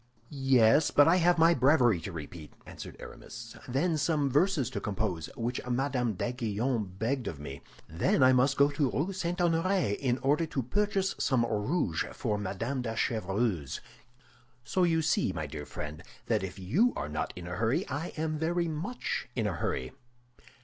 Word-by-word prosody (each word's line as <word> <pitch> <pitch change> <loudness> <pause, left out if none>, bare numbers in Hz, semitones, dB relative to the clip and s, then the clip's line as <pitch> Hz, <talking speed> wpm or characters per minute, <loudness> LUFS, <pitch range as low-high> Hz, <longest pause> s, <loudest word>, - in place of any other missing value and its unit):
"Yes, 135 -1 +4
but 145 - +5
I 170 +3 +5
have 175 0 +4
my 165 +1 +6
breviary 125 - +4
to 100 - -6
repeat," 80 -1 -8
answered - - -9
Aramis; - - -10
"then 155 +6 +1
some 145 -3 +1
verses 145 - +2
to - - -4
compose, 95 -5 -2
which 120 +2 -2
Madame 125 -2 0
d'Aiguillon 110 -2 -2
begged 120 +2 -1
of 75 - -5
me. 70 -1 -7 0.3
Then 80 +10 +2
I 130 0 +7
must 130 +2 +3
go 140 +1 +5
to 145 -2 +1
the - - -3
Rue 175 +8 0
St. 175 -2 -2
Honoré 175 - +2
in 125 0 0
order 150 +4 +2
to 140 -5 -2
purchase 195 - 0
some 125 -4 +2
rouge 105 - 0
for 105 -1 -2
Madame 115 +7 -3
de 115 -2 -3
Chevreuse. 100 - -1 0.8
So 185 - -1
you 165 -2 +3
see, 150 -10 +1
my 80 - -3
dear 75 0 -7
friend, 75 +3 -6 0.2
that - - +1
if 95 0 -6
you 145 - +2
are - - -3
not 75 +1 -3
in 90 - -8
a 90 0 -5
hurry, 115 +4 +1
I 145 +5 -3
am 155 -1 -1
very 170 +2 0
much 165 +11 -3
in 115 -4 0
a 105 - 0
hurry." 65 -6 -2
125 Hz, 175 wpm, -30 LUFS, 100-160 Hz, 0.8 s, I